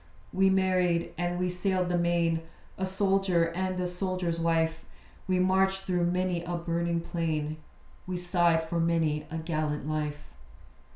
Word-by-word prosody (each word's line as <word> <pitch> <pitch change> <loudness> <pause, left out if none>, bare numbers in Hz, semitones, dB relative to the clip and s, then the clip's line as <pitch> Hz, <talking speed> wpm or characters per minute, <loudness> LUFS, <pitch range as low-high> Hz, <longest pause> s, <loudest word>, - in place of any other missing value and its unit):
We 190 +1 +4
married, 185 -3 +2
and 175 0 -1
we 180 0 0
sailed 180 0 0
the 175 - +1
main; 170 -1 +2 0.3
A 190 - -2
soldier, 190 -3 +2
and 185 +1 -2
a 180 - 0
soldier's 180 -2 -2
wife. 165 -1 +1 0.4
We 185 -1 +2
marched 190 +1 +2
through 180 -2 +1
many 180 -1 0
a 175 0 -3
burning 170 0 -1
plain; 155 -3 -2 0.5
We 185 -1 -2
sighed 175 -2 +2
for 170 +1 -1
many 165 -2 +1
a 165 - -4
gallant 155 -2 -2
life. 150 -1 -3
175 Hz, 150 wpm, -29 LUFS, 165-185 Hz, 0.5 s, We